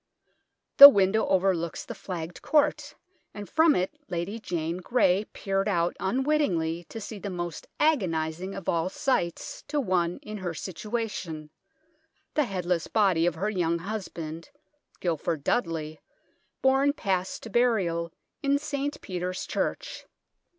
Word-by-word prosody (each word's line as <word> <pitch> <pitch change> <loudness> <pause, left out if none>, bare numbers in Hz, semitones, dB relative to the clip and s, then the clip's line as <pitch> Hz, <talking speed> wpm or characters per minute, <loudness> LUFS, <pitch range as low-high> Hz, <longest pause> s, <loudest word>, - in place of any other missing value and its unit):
The 280 0 +14
window 200 -2 +2
overlooks 185 -3 0
the - - -6
flagged 175 -2 -6
court, 300 -1 +1 0.4
and 205 -1 -7
from 320 0 +4
it 185 +1 -1 0.2
Lady 180 +5 -3
Jane 170 -4 -3
Grey 190 0 +2
peered 195 0 -1
out 170 -3 +1
unwittingly 190 - 0
to 225 - -8
see 210 0 -7
the 200 - -5
most 175 -3 -5
agonising 185 - 0
of 195 - -8
all 170 +1 +1
sights 190 - -2
to 295 0 -1
one 180 -7 0
in 215 0 -6
her 175 -3 -4
situation 185 -6 -5 0.8
the 300 - +2
headless 180 -5 -1
body 190 -6 +3
of 175 - 0
her 200 +6 -1
young 170 -4 0
husband, 170 - -6 0.5
Guilford 165 -3 -2
Dudley, 160 -7 -1 0.6
borne 270 +2 +4
past 190 -8 -2
to 225 - -8
burial 190 -9 +1 0.3
in 280 -1 +2
St. 285 0 -3
Peter's 180 0 -4
church. - - -3
185 Hz, 130 wpm, -27 LUFS, 170-230 Hz, 0.8 s, The